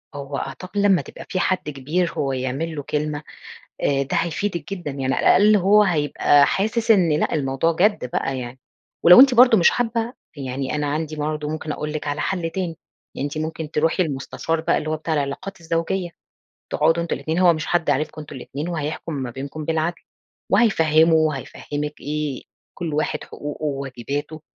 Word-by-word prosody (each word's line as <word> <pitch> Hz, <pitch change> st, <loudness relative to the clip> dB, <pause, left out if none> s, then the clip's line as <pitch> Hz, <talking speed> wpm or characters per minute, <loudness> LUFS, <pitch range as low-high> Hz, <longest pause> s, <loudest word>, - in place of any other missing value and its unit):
هو 140 Hz, 0 st, -5 dB
أعتقد 185 Hz, +3 st, -6 dB
لمّا 200 Hz, -3 st, +4 dB
تبقى -, -, -11 dB
فيه 185 Hz, -, -1 dB
حد 185 Hz, -4 st, 0 dB
كبير 150 Hz, +6 st, -1 dB
هو 135 Hz, -2 st, -1 dB
يعمل 135 Hz, +6 st, -3 dB
له 145 Hz, -, -4 dB
كلمة 150 Hz, +1 st, -2 dB, 0.6 s
آآ، 140 Hz, -1 st, +2 dB
ده 135 Hz, -, -2 dB
هيفيدِك 170 Hz, 0 st, -2 dB
جدًا، 175 Hz, -5 st, -6 dB
يعني 135 Hz, -1 st, -1 dB
على -, -, -1 dB
الأقل 210 Hz, +2 st, +6 dB
هو 205 Hz, +3 st, +5 dB
هيبقى 145 Hz, -5 st, +3 dB
حاسس 220 Hz, +3 st, 0 dB
إن 180 Hz, -7 st, +5 dB
لأ، -, -, 0 dB
الموضوع 135 Hz, +3 st, +1 dB
جدّ 185 Hz, -, +2 dB
بَقى 135 Hz, -1 st, -1 dB
يعني. 125 Hz, +1 st, -7 dB, 0.4 s
ولو 175 Hz, +7 st, +10 dB
أنتِ 265 Hz, -2 st, +7 dB
برضه 240 Hz, -2 st, +7 dB
مش 175 Hz, -, +6 dB
حابة، 230 Hz, 0 st, -1 dB, 0.2 s
يعني 135 Hz, 0 st, -3 dB
أنا 150 Hz, -1 st, -1 dB
عندي 155 Hz, +1 st, -2 dB
برضه 150 Hz, 0 st, -2 dB
ممكن 155 Hz, 0 st, -4 dB
أقول 150 Hz, 0 st, -4 dB
لِك 155 Hz, -, -4 dB
على 145 Hz, +1 st, -2 dB
حلّ 175 Hz, -3 st, -1 dB
تاني، 175 Hz, -2 st, -3 dB, 0.4 s
أنتِ 145 Hz, +2 st, -3 dB
ممكن 155 Hz, 0 st, -4 dB
تروحي 160 Hz, +4 st, +2 dB
لمستشار 160 Hz, +2 st, -2 dB
بَقى -, -, +1 dB
اللي 155 Hz, -, -4 dB
هو 155 Hz, -, 0 dB
بتاع 160 Hz, +1 st, -3 dB
العلاقات 150 Hz, +6 st, -3 dB
الزوجية، 165 Hz, +2 st, -2 dB, 0.6 s
تقعدوا 170 Hz, +1 st, +2 dB
أنتم 170 Hz, -, -2 dB
الاتنين، 160 Hz, +2 st, -2 dB
هو 180 Hz, -2 st, +6 dB
مش 155 Hz, -, -4 dB
حد 175 Hz, -1 st, +1 dB
عارفكم 155 Hz, +2 st, -1 dB
أنتم 150 Hz, -1 st, -10 dB
الاتنين، 145 Hz, +5 st, -5 dB
وهيحكُم 155 Hz, 0 st, -4 dB
ما 130 Hz, -4 st, -4 dB
بينكُم 140 Hz, +4 st, -6 dB
بالعدل، 165 Hz, +2 st, -1 dB, 0.5 s
وهيفهِّمه 160 Hz, -7 st, +4 dB
وهيفهِّمِك 150 Hz, -1 st, -2 dB
إيه 150 Hz, -2 st, -3 dB, 0.3 s
كُلّ 165 Hz, -4 st, -4 dB
واحد 150 Hz, 0 st, -1 dB
حقوقه 150 Hz, +1 st, -7 dB
وواجباته، 140 Hz, +2 st, -4 dB
155 Hz, 175 wpm, -22 LUFS, 145-175 Hz, 0.6 s, ولو